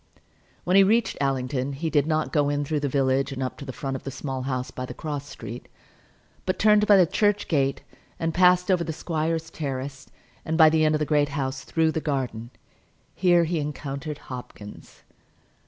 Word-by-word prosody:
When 180 - +1
he 195 - +8
reached 225 +4 +2
Allington 135 0 -1
he 160 +4 -3
did 145 0 +2
not 155 -1 0
go 145 -3 +2
in 145 0 -1
through 150 +1 -1
the 145 -1 -1
village 135 0 +1
and 135 -1 -3
up 130 - -3
to 140 - -7
the 135 - -5
front 135 +1 -4
of 130 - -5
the - - -4
Small 135 -1 -5
House 130 -1 -3
by 130 - -6
the - - -8
cross 145 -2 -5
street, 115 +2 -8 0.8
but 185 - -1
turned 210 0 +4
by 205 - +7
the 185 - +6
church 205 +4 +1
gate 140 -4 0 0.4
and 165 0 -1
passed 180 +1 +4
over 180 -2 +2
the 160 -1 -4
squire's 160 0 -2
terrace, 135 -2 -5 0.3
and 160 0 -2
by 160 -2 +7
the 160 0 +3
end 155 0 +3
of - - 0
the 150 - 0
Great 145 -1 +2
House 135 -2 -3
through 160 -1 +1
the 160 - -2
garden. 125 -6 -3 0.6
Here 175 -2 +4
he 165 0 -1
encountered 145 0 -5 0.2
Hopkins. 105 -4 -10
145 Hz, 200 wpm, -25 LUFS, 135-165 Hz, 0.8 s, he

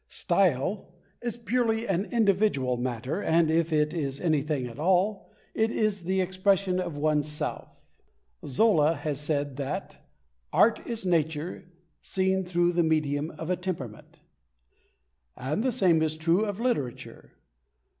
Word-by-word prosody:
"Style" 185 +2 +1 0.3
is 240 -1 -3
purely 235 -1 0
an 195 +1 0
individual 200 - +2
matter, 125 - -3
and, 160 -2 +3
if 165 0 +1
it 150 0 +2
is 140 -5 -3
anything 150 -5 0
at 120 +2 -9
all, 190 +5 +1 0.2
it 220 0 +1
is 205 -5 0
the 190 +1 +1
expression 185 0 +1
of 175 -5 -4
one's 150 0 +1
self. 150 0 -6 0.4
Zola 160 - +3
has 145 -1 -3
said 145 -2 -1
that, 140 -2 -4 0.5
"art 230 - +4
is 230 -4 -4
nature 165 0 -1 0.3
seen 190 0 0
through 175 -1 +1
the 175 0 +2
medium 155 -2 0
of 160 +3 -4
a - - +2
temperament," 165 - -6 1.2
and 145 +10 -2
the 260 - +1
same 185 -9 +3
is 155 0 0
true 170 +6 +2
of 205 -1 -4
literature. 230 - -3
170 Hz, 135 wpm, -27 LUFS, 150-195 Hz, 1.2 s, art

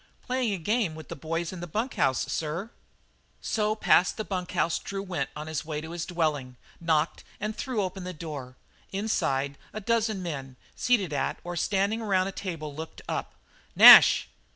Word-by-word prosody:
"Playing 250 -3 0
a 195 - -1
game 200 -1 0
with 160 -1 -11
the - - -5
boys 165 +4 -3
in 185 - -7
the 175 - -6
bunk 220 - -2
house, 130 -1 +1
sir." 170 +8 -3 0.7
So 215 -1 0
past 190 -4 +3
the 215 - -2
bunk 180 -2 -4
house 170 -2 +1
Drew 195 0 -5
went 175 -8 -3
on 150 +1 -6
his 155 -1 -3
way 150 -1 -4
to 160 +2 -8
his 170 -1 -4
dwelling, 150 -7 -1 0.2
knocked, 160 -2 0 0.2
and 210 +1 -3
threw 245 -6 -2
open 185 0 -5
the 180 - -5
door. 150 -6 -7 0.4
Inside, 140 -9 -1
a 215 - -4
dozen 220 -2 0
men, 135 -6 -5 0.2
seated 200 -10 +1
at - - -1
or 175 0 -5
standing 200 +5 0
around 190 -4 +1
a 195 - -3
table, 165 -7 -5
looked 160 +2 -8
up. - - -4 0.4
"Nash!" - - +10
175 Hz, 180 wpm, -27 LUFS, 155-205 Hz, 0.7 s, Nash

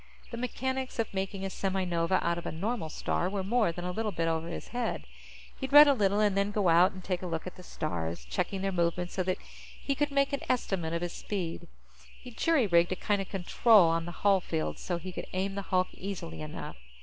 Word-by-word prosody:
The 235 - -5
mechanics 260 +2 -3
of 230 -3 -1
making 195 0 -3
a 195 - -3
semi 190 0 -1
nova 170 +1 +1
out 170 0 +1
of - - -7
a - - -2
normal 195 0 -2
star 175 +3 -1
were 195 -1 -2
more 215 -1 +2
than 175 +1 -6
a 180 - -2
little 220 +3 -2
bit 165 -2 -1
over 165 0 -1
his 170 - -6
head. 245 -2 -2 0.5
He'd 265 0 -4
read 295 +1 +10
a 285 - +6
little 205 -4 +2
and 205 -2 +3
then 200 +1 +2
go 205 -3 +1
out 175 +3 +6
and 185 -1 -10
take 180 -1 -2
a 185 - -4
look 165 -2 -3
at 185 - -7
the - - -12
stars, 85 - -4
checking 190 - -2
their 195 - 0
movement 175 0 0
so 190 - -1
that 185 0 0 0.4
he 280 - -1
could 295 +2 0
make 280 0 +1
an 280 - -1
estimate 190 -9 0
of 170 +1 -1
his 175 - -3
speed. 180 -5 -4 0.5
He'd 245 -2 -12
jury 320 -4 +3
rigged 170 -2 +3
a - - -3
kind 205 +1 0
of 195 - -6
control 195 0 +5
on 165 0 0
the 175 - -5
hull 195 -2 +5
field, 160 -2 -3
so 175 - -2
he 185 +2 -7
could - - -6
aim 190 +1 -1
the 200 - -3
hulk 185 -1 +2
easily 175 - -6
enough. 75 - -7
190 Hz, 240 wpm, -30 LUFS, 170-215 Hz, 0.5 s, read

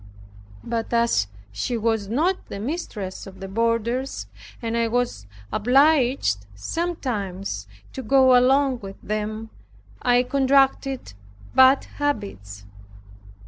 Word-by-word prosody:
But 230 -1 -3
as 230 - +2 0.2
she 105 - -2
was 225 -2 0
not 325 - 0
the 200 - -6
mistress 210 - -5
of 190 -1 -12
the 195 - -6
boarders, 230 +5 -1 0.3
and 230 -1 -3
I 230 0 +2
was 230 - -1 0.3
obliged 250 - +3
sometimes 205 - -3 0.3
to 265 - -5
go 260 +1 +5
along 260 +1 +4
with 195 -2 -9
them, 215 +1 -3 0.5
I 245 0 +4
contracted 270 - +2 0.4
bad 260 +1 +6 0.2
habits. 100 - -3
235 Hz, 105 wpm, -23 LUFS, 200-265 Hz, 0.5 s, bad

